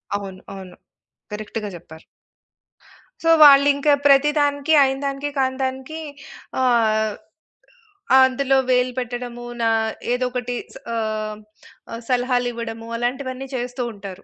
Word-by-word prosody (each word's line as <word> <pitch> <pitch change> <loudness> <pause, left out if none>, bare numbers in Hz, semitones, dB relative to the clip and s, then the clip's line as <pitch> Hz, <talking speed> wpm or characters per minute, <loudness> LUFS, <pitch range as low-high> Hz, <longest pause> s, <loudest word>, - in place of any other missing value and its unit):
అవును. 195 -2 -6
అవును. 185 -2 -10 0.6
కరెక్ట్‌గా 210 0 -5
జెప్పారు. 160 -2 -13 1.2
సో 330 - +2 0.2
వాళ్ళింకా 285 +1 +6
ప్రతి 285 +1 +5
దానికి 285 +1 +1
అయిన 270 0 +2
దానికి 275 +1 -3
కానీ 260 -1 +1
దానికి 265 +4 -4 0.6
ఆహ్, 220 -4 +2 1.0
అందులో 265 +1 +3
వేలు 250 0 +2
పెట్టడము, 245 0 -6 0.2
నా 230 - +2 0.4
ఏదొకటి 250 -1 -2 0.2
స - - -7 0.2
ఆహ్, 215 -1 -3 0.5
ఆహ్, 230 +1 -6
సలహాలివ్వడము. 245 -2 -1
అలాంటివన్నీ 260 +2 -3
చేస్తూ 245 0 -3
ఉంటారు. 195 -2 -10
250 Hz, 105 wpm, -21 LUFS, 225-270 Hz, 1.2 s, వాళ్ళింకా